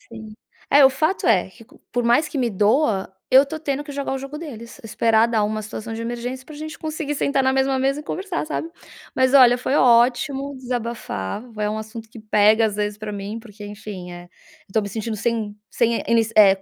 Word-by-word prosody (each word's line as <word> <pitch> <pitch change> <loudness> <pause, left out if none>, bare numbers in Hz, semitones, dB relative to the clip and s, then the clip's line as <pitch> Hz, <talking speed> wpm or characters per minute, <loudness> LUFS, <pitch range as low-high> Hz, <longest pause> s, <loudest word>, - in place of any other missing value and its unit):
Sim. 220 -2 -11 0.4
É 285 0 +6
o 265 - +7
fato 310 +8 0
é, - - +3
qu 230 - -16
que - - -20
por 245 0 0
mais 265 +7 +3
que 300 - -5
me 245 -3 +1
doa, 210 0 +1 0.2
eu 265 +2 +7
tô 315 +3 -6
tendo 285 -2 -2
que 295 - -9
jogar 280 -1 -3
o 270 - -2
jogo 275 +3 -7
deles, 235 -8 -9
esperar 225 +1 +2
dar 225 -2 +1
uma 215 +1 -2
situação 215 +1 -7
de 225 - -5
emergência, 240 +3 -5
pra 305 - -11
gente 310 +2 -7
conseguir 310 -2 -4
sentar 275 -1 +1
na 265 0 +2
mesma 270 0 +1
mesa 270 +2 0
e 300 - -8
conversar, 370 +1 -3
sabe? 320 +1 -4 0.5
Mas 260 0 +2
olha 250 -3 +7
foi 255 +2 -1
ótimo 260 +3 +3
desabafar. 235 - -4 0.2
É 210 0 0
um 215 - -3
assunto 220 +1 -8
que 225 - -12
pega 215 +1 +4
às 210 -2 -2
vezes 210 0 -2
pra 215 0 -6
mim, 205 +2 -5
porque, 210 -2 -12
enfim, 205 -3 -8
é, 175 0 -9 0.4
eu 190 - -20
tô 220 - +3
me 205 - -5
sentindo 220 +2 -4
sem 220 -1 -2
sem 235 -1 +1
é - - -6
ini 230 -1 +5
é 195 -2 +6
235 Hz, 225 wpm, -22 LUFS, 215-275 Hz, 0.5 s, o